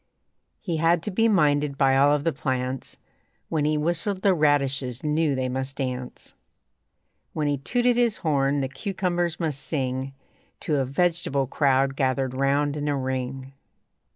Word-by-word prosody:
He 175 -6 -2
had 165 +1 +2
to 210 - -3
be 225 +4 +2
minded 150 -8 +2
by 135 -1 +3
all 140 +2 +5
of 145 -1 +1
the 165 - 0
plants; 130 -1 -3 0.5
When 155 -2 0
he 155 0 +1
whistled 175 +5 -1
the 195 - +5
radishes 140 -5 +1
knew 150 -1 +1
they 130 0 -1
must 130 +1 -3
dance; 125 -2 -5 1.0
When 150 -2 -1
he 145 -2 0
tooted 245 - +1
his 235 -3 +2
horn 140 -2 +2
the 135 - -1
cucumbers 175 - -2
must 155 -5 -2
sing 130 -2 -3 0.5
To 150 - 0
a 135 - +1
vegetable 165 0 0
crowd 135 0 +1
gathered 130 -1 0
round 140 +2 +1
in 150 0 -3
a 145 -1 0
ring. 130 0 -4
145 Hz, 155 wpm, -25 LUFS, 135-165 Hz, 1.0 s, all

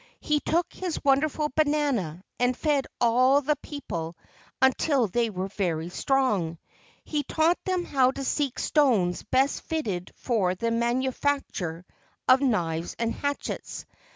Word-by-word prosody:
He 300 -1 +1
took 335 +3 0
his 360 -3 -3
wonderful 300 +2 +2
banana 285 - 0 0.2
and 245 0 +2
fed 290 -4 +1
all 255 +4 +4
the 295 +1 +1
people 170 - -6 0.4
until 265 0 +3
they 230 +3 0
were 190 -2 -3
very 170 -5 -2
strong. 205 -8 0 0.5
He 300 -2 -1
taught 315 +4 +1
them 365 -2 0
how 260 -2 +3
to 275 +1 -4
seek 275 -1 -1
stones 225 - +2
best 265 +5 +1
fitted 205 - -3
for 195 -7 0
the 230 +5 -1
manu¬ 240 +3 0
facture 180 - -2 0.4
of 260 +1 +6
knives 170 - 0
and 230 0 -1
hatchets. 285 0 -4
255 Hz, 135 wpm, -26 LUFS, 195-290 Hz, 0.5 s, of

